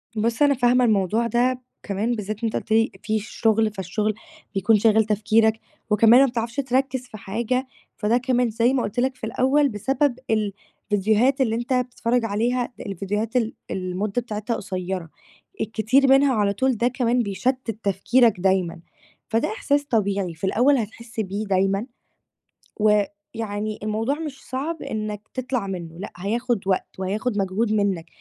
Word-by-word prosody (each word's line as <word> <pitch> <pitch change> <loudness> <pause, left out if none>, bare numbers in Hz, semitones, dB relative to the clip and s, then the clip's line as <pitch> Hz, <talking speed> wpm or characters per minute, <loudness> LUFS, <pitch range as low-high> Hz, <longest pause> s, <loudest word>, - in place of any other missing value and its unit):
بُص، 225 +4 0
أنا 290 -1 +6
فاهمة 245 -1 +3
الموضوع 215 +2 +2
ده 250 +2 +1 0.2
كمان 210 +4 -1
بالذات 215 +1 -5
أنت 225 - -1
قُلت - - -4
لي 225 +1 +3
في 215 0 0
شُغل، 220 +1 +1
فالشُغل 210 +2 -2 0.4
بيكون 210 +3 +4
شاغل 220 0 +4
تفكيرك 220 +1 +2 0.3
وكمان 225 +4 +6
ما - - +7
بتعرفش 235 -1 -3
تركِّز 260 -1 0
في 215 - -10
حاجة، 235 +6 -2 0.3
فده 220 +3 +2
كمان 250 -1 +1
زي 230 +4 +2
ما 255 - +1
قُلت 215 +4 -3
لك 260 +1 +1
في 255 - -26
الأول 265 +5 +2
بسبب 260 +4 0
الفيديوهات 215 +3 0
اللي 225 -4 +2
أنت 240 +3 -2
بتتفرّج 245 -1 0
عليها 240 +4 0
الفيديوهات 205 +4 -3
ال 230 -2 +1 0.2
المدّة 195 +5 -2
بتاعتها 215 0 -3
قصيّرة، 185 -3 -4 0.5
الكتير 225 +6 +2
منها 270 0 +5
على 205 -2 +2
طول 260 +3 +1
ده 235 +3 +2
كمان 245 -1 +1
بيشتِّت 245 +4 -1
تفكيرك 210 +3 +3
دايمًا، 180 -3 +1 0.5
فده 230 +7 +1
إحساس 290 -12 0
طبيعي. 200 -7 0
في 160 - -20
الأول 245 +9 +3
هتحس 230 0 -6
بيه 205 +1 -2
دايمًا 195 +3 +1 0.9
ويعني 210 0 -1
الموضوع 220 +5 0
مش 295 -4 -6
صعب 300 +6 -3
إنّك 215 -1 -5
تطلع 255 -4 -2
منّه 170 -3 -6
لأ، 200 - -7
هياخُد 225 +4 -1
وقت 190 -1 +1
وهياخُد 205 +4 -2
مجهود 200 +3 0
منّك، 195 -6 0
220 Hz, 150 wpm, -23 LUFS, 205-250 Hz, 0.9 s, ما